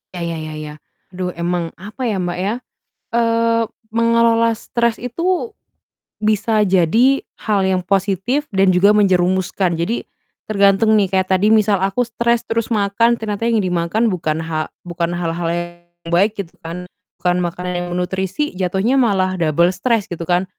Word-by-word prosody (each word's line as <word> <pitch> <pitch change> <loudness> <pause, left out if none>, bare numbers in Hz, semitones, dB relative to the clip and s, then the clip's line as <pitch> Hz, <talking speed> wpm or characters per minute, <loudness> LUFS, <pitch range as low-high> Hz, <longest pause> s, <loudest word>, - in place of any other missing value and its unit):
Ya 175 - -5
ya 165 -1 -3
ya 155 0 -6
ya. 150 -1 -7 0.4
Aduh 180 0 -3
emang, 170 -1 -2
apa 215 +7 -7
ya, 215 -5 0
Mbak, 175 0 -3
ya, 200 +4 0 0.6
eee, 230 0 +2 0.3
mengelola 230 0 +3
stres 235 0 -1
itu, 360 - -2 0.7
bisa 215 +1 +2
jadi 220 +10 +3 0.2
hal 205 -3 +1
yang 190 -1 +1
positif 195 - 0
dan 195 0 +4
juga 200 +3 +5
menjerumuskan. 185 -3 +1
Jadi, 220 +8 -1 0.4
tergantung 200 +1 +3
nih, 200 - +2
kayak 190 -1 0
tadi 190 +2 +3
misal 215 -3 +3
aku 195 +5 +1
stres 235 +1 0
terus 230 0 -1
makan, 225 +2 +2
ternyata 220 +1 -3
yang 225 -3 +2
dimakan 180 +6 0
bukan 160 -3 -2
ha 155 -1 -2 0.2
bukan 170 -1 -3
hal-hal 170 0 -2
yang 175 0 -6
baik 200 +5 +3
gitu 175 -3 -12
kan, 170 +2 -6 0.4
bukan 180 0 +2
makanan 180 +1 -3
yang 175 - -4
bernutrisi 190 +9 -2
jatuhnya 190 +7 +1
malah 190 -6 +1
double 170 +2 +3
stres, 225 +2 0
gitu 170 -1 -4
kan. 180 +1 +2
190 Hz, 155 wpm, -19 LUFS, 175-225 Hz, 0.7 s, juga